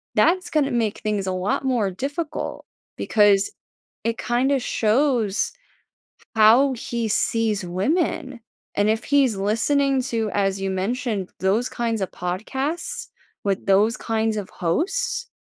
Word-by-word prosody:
that's 365 Hz, +2 st, +3 dB
gonna 295 Hz, -3 st, +1 dB
make 225 Hz, -3 st, 0 dB
things 210 Hz, -3 st, -2 dB
a 185 Hz, -, 0 dB
lot 185 Hz, +6 st, -1 dB
more 240 Hz, -7 st, +1 dB
difficult 285 Hz, -, -4 dB, 0.3 s
because 205 Hz, -2 st, +3 dB, 0.5 s
it 230 Hz, 0 st, -1 dB
kinda 265 Hz, +3 st, +1 dB
shows 230 Hz, -2 st, +1 dB, 0.8 s
how 230 Hz, +6 st, +6 dB
he 235 Hz, -1 st, -3 dB
sees 215 Hz, -2 st, 0 dB
women. 260 Hz, -, -1 dB, 0.4 s
And 205 Hz, +1 st, +2 dB
if 220 Hz, +2 st, +1 dB
he's 275 Hz, -6 st, +3 dB
listening 260 Hz, +7 st, +1 dB
to, 225 Hz, -4 st, -1 dB
as 195 Hz, -1 st, 0 dB
you 195 Hz, -, -1 dB
mentioned, 200 Hz, +1 st, -2 dB
those 205 Hz, +6 st, +1 dB
kinds 230 Hz, -2 st, -2 dB
of 190 Hz, -, -2 dB
podcasts 265 Hz, -, -3 dB, 0.4 s
with 195 Hz, -2 st, -1 dB
those 205 Hz, +4 st, +3 dB
kinds 220 Hz, -1 st, -1 dB
of 200 Hz, -3 st, -4 dB
hosts, 390 Hz, -, -1 dB
225 Hz, 130 wpm, -23 LUFS, 200-265 Hz, 0.8 s, how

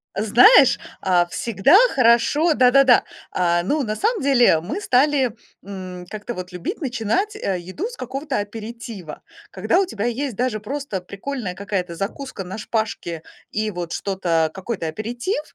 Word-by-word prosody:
Знаешь, 225 Hz, -, +6 dB, 0.2 s
а, 180 Hz, -2 st, +3 dB
всегда 225 Hz, -, +3 dB, 0.2 s
хорошо 260 Hz, +7 st, +4 dB
Да-да-да. 255 Hz, -1 st, +5 dB, 0.3 s
А, 175 Hz, -1 st, +1 dB
ну, 290 Hz, +10 st, 0 dB
на 215 Hz, -2 st, -2 dB
самом 440 Hz, -, 0 dB
деле, 245 Hz, -, +4 dB
мы 220 Hz, -, -5 dB
стали, 270 Hz, -, +2 dB, 0.3 s
м, 185 Hz, -2 st, -8 dB
как-то 215 Hz, +3 st, -6 dB
вот 180 Hz, 0 st, -7 dB
любить 180 Hz, -, -5 dB
начинать, 265 Hz, -, -1 dB
э, 195 Hz, -, -2 dB
еду 185 Hz, -, -5 dB
с -, -, -9 dB
какого-то 275 Hz, -, -4 dB
аперитива. 215 Hz, -5 st, -7 dB, 0.3 s
Когда 215 Hz, -, +1 dB
у 390 Hz, -, +2 dB
тебя 225 Hz, -, -4 dB
есть 245 Hz, +1 st, -2 dB
даже 240 Hz, -1 st, -1 dB
просто 270 Hz, -2 st, -4 dB
прикольная 200 Hz, +2 st, -5 dB
какая-то 190 Hz, -3 st, -3 dB
закуска 200 Hz, +3 st, -5 dB
на 185 Hz, +4 st, -7 dB
шпажке 215 Hz, -8 st, -3 dB, 0.3 s
и 215 Hz, 0 st, -1 dB
вот 175 Hz, -2 st, -5 dB
что-то, 170 Hz, -5 st, 0 dB
какой-то 190 Hz, -3 st, -4 dB
аперитив, 240 Hz, -, -3 dB
220 Hz, 145 wpm, -21 LUFS, 185-270 Hz, 0.3 s, Знаешь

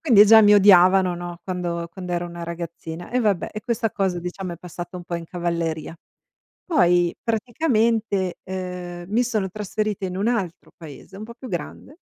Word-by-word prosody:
quindi 230 Hz, -10 st, +7 dB
già 220 Hz, +1 st, +9 dB
mi 210 Hz, -1 st, +6 dB
odiavano, 185 Hz, -2 st, +6 dB
no, 175 Hz, 0 st, -7 dB
quando 175 Hz, -2 st, -3 dB
quando 180 Hz, -2 st, -6 dB
ero 175 Hz, 0 st, -1 dB
una 170 Hz, 0 st, -8 dB
ragazzina 170 Hz, 0 st, -7 dB
e 250 Hz, -, +1 dB
vabbè, 205 Hz, -6 st, 0 dB
e 215 Hz, -, -5 dB
questa 230 Hz, -2 st, -1 dB
cosa 190 Hz, -3 st, -1 dB
diciamo 180 Hz, +1 st, -5 dB
è -, -, -12 dB
passata 175 Hz, +1 st, -8 dB
un 175 Hz, -, -8 dB
po' 175 Hz, -, -5 dB
in 170 Hz, -1 st, -7 dB
cavalleria. 170 Hz, -2 st, -3 dB, 0.7 s
Poi 175 Hz, -, +3 dB
praticamente, 225 Hz, -, 0 dB
ehm, 180 Hz, -2 st, -6 dB
mi 230 Hz, +4 st, +2 dB
sono 215 Hz, -5 st, -1 dB
trasferita 210 Hz, 0 st, -3 dB
in 185 Hz, -1 st, -4 dB
un 205 Hz, +4 st, +1 dB
altro 190 Hz, -7 st, -3 dB
paese 160 Hz, +3 st, -12 dB
un 210 Hz, -, -7 dB
po' 235 Hz, -, -10 dB
più 255 Hz, +1 st, -10 dB
grande 185 Hz, -, -6 dB
185 Hz, 180 wpm, -23 LUFS, 175-215 Hz, 0.7 s, già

